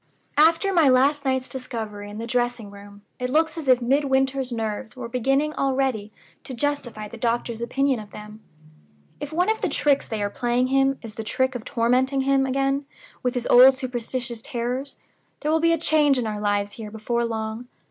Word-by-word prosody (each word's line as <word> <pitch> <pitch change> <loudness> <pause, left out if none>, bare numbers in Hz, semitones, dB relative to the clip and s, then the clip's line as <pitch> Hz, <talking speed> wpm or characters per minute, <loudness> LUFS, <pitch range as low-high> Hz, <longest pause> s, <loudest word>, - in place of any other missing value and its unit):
"After 330 +5 +4
my 325 -6 +5
last 280 +3 +3
night's 260 -1 0
discovery 220 -5 -6
in 205 - -8
the 225 - -4
dressing 240 -3 -1
room, 200 0 -13 0.2
it 250 0 -2
looks 315 +3 +2
as 320 -4 -6
if 255 -1 +4
Midwinter's 265 0 +1
nerves 220 0 -4
were 255 -2 -6
beginning 270 +5 0
already 265 -7 -1 0.3
to 260 - -7
justify 240 -6 -3
the 235 - -10
doctor's 235 0 -1
opinion 265 +1 0
of 210 -1 -10
them. 210 +1 -11 0.8
If 290 - -6
one 355 +4 +1
of 440 0 0
the - - 0
tricks 285 -2 +2
they 220 -3 -3
are 205 - -2
playing 245 +1 0
him 270 0 +2
is 225 -2 -8
the 220 - -6
trick 260 +4 0
of 245 -3 -6
tormenting 255 +4 +1
him 270 0 +2
again 275 +1 0 0.3
with 250 0 -1
his 245 -1 -2
old 260 +2 +8
superstitious 245 -2 -4
terrors, 250 +1 -4 0.5
there 300 - 0
will 320 - +3
be 335 +1 +3
a 330 - +3
change 300 -3 +3
in 245 - -1
our 210 -1 -3
lives 205 -1 0
here 215 0 -8
before 225 +2 -2
long. 220 +1 -4
255 Hz, 190 wpm, -24 LUFS, 225-275 Hz, 0.8 s, old